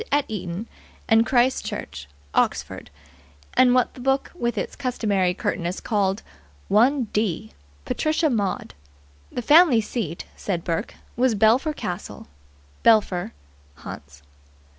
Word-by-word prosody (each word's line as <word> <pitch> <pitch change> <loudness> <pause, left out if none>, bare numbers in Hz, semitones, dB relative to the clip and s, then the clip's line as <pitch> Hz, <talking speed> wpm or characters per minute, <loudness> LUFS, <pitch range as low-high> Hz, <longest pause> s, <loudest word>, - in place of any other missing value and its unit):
Eton 190 -1 -5 0.4
and 225 +1 +4
Christ 255 +1 +2
Church, 70 - -6 0.3
Oxford, - - -1 0.6
and 250 -1 +5
what 250 - +2
the - - -13
book 270 +2 0
with 240 -9 -2
its - - -3
customary 205 -9 0
curtness 175 -1 -2
called 200 -1 0 0.5
"one 250 +6 +4
d." 195 - -1 0.3
Patricia 310 +1 +1
Maud. 205 -5 -2 0.6
The 245 - -4
family 300 -3 +6
seat, 210 -6 -4
said 175 -4 -3
Burke, 165 -1 -3 0.2
was 245 -1 +2
Belpher 230 +9 +3
Castle, 175 - -6 0.5
Belpher, 205 -6 +3 0.5
Hants. 70 0 -10
220 Hz, 115 wpm, -23 LUFS, 185-255 Hz, 0.6 s, family